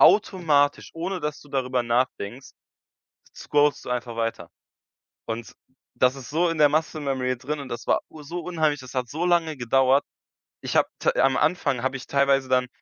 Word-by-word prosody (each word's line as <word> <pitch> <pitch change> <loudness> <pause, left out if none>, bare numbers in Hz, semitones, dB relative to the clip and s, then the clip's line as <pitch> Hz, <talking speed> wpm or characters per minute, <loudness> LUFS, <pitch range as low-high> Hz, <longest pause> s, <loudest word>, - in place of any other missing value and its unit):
automatisch, 155 -8 +4
ohne 180 +3 -3
dass 150 -1 -3
du 145 - -16
darüber 130 -2 0
nachdenkst, 120 0 -1 0.9
scrollst 145 0 +1
du - - -6
einfach 125 -1 -3
weiter. 115 -7 -3 0.8
Und 115 0 -5 0.4
das 125 0 +3
ist 135 -3 -9
so 170 +4 +2
in 165 -1 -3
der 150 -1 +7
muscle 155 +1 0
memory 130 -2 -1
drin 145 +4 -4
und 135 - -9
das 120 0 -6
war - - +3
u 155 - -11
so 170 +4 -5
unheimlich. 155 -5 0
Das 130 - -11
hat 125 -2 -2
so 160 +4 -2
lange 170 -4 +2
gedauert. 130 +3 +3 0.6
Ich - - -4
habe - - +4
t - - +2
am 135 0 +4
Anfang 145 -6 +1
habe 135 +1 -1
ich 130 - -11
teilweise 140 -1 +2
dann 125 0 +2
140 Hz, 185 wpm, -25 LUFS, 125-155 Hz, 0.9 s, der